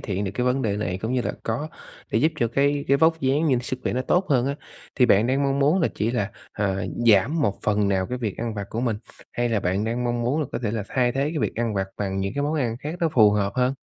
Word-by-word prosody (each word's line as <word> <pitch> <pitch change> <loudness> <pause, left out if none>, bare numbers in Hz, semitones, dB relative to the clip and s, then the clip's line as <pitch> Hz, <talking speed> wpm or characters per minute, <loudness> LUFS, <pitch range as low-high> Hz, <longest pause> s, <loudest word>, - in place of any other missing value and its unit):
thiện 100 -1 -3
được 95 - -2
cái 125 - -1
vấn 130 +2 +1
đề 105 -4 0
này, 90 -3 -2
cũng 110 +3 -1
như 130 -1 +1
là - - -2
có 130 +8 -2 0.4
thể 110 - +3
giúp 155 +6 +2
cho 120 -5 +1
cái 140 +4 +1
cái 140 - +5
vóc 160 +2 +3
dáng 140 +4 +2
nhưng 130 -4 +2
sức 130 +1 -4
khỏe - - -1
nó 130 +1 -1
tốt 180 +6 +1
hơn 130 -2 +3
á, 140 - -1 0.4
thì 125 - +4
bạn 105 -1 +4
đang 135 +3 +1
mong 140 0 +1
muốn 150 +7 +3
là 165 - +2
chỉ 110 +2 0
là, 110 -4 -1 0.2
à, 100 -2 -1 0.4
giảm 135 - +2
một 100 -8 0
phần 105 -1 +1
nào 95 -1 +1
cái 125 +4 -4
việc 110 -5 -3
ăn 115 -1 -3
vặt 100 -2 -4
của 115 - -2
mình, 115 -4 0 0.4
hay 120 0 0
là 110 -3 +1
bạn 95 +4 0
đang 120 +2 -2
mong 120 0 -1
muốn 135 +7 0
là 145 - -1
có - - -1
thể 105 - 0
là 110 -2 -2
thay 125 -2 +1
thế 135 - -1
cái 160 - -3
việc - - -1
ăn 115 -2 -1
vặt 95 -1 0
bằng 95 -1 -2
những 95 +5 -2
cái 145 - -1
món 150 +2 0
ăn 120 -7 -1
khác 150 +3 -4
nó 165 - +3
phù 110 -8 +5
hợp 100 -1 0
hơn? 125 +1 +1
120 Hz, 300 wpm, -24 LUFS, 105-140 Hz, 0.4 s, cái